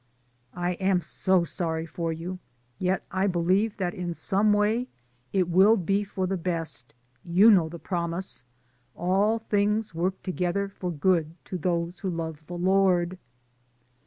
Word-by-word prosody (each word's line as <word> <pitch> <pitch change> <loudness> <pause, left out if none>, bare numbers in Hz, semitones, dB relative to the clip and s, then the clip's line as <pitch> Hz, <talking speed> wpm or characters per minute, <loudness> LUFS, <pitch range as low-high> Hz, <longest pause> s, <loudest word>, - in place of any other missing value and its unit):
"I 175 0 -1
am 190 -1 +3
so 180 +2 +1
sorry 165 -1 -2
for 165 0 -3
you, 175 +3 -5 0.4
yet 185 +1 0
I 190 +2 +1
believe 190 +4 +1
that 180 -3 -1
in 175 -2 -4
some 205 +4 +2
way 215 +4 +2 0.4
it 185 -3 +2
will 190 +6 +5
be 195 +2 +1
for 195 -2 -3
the 190 +1 -1
best, 165 -9 -4 0.3
you 185 +6 +6
know 175 -6 +4
the 170 - -7
promise, 170 -4 -3 0.5
'All 195 +5 +2
things 210 -1 0
work 180 +3 -2
together 185 +2 -1
for 185 -2 -5
good, 165 0 +1
to - - -6
those 170 +1 -1
who 190 - -2
love 160 -3 -5
the 175 - -6
Lord.' 185 -1 +2
180 Hz, 150 wpm, -27 LUFS, 170-195 Hz, 0.5 s, you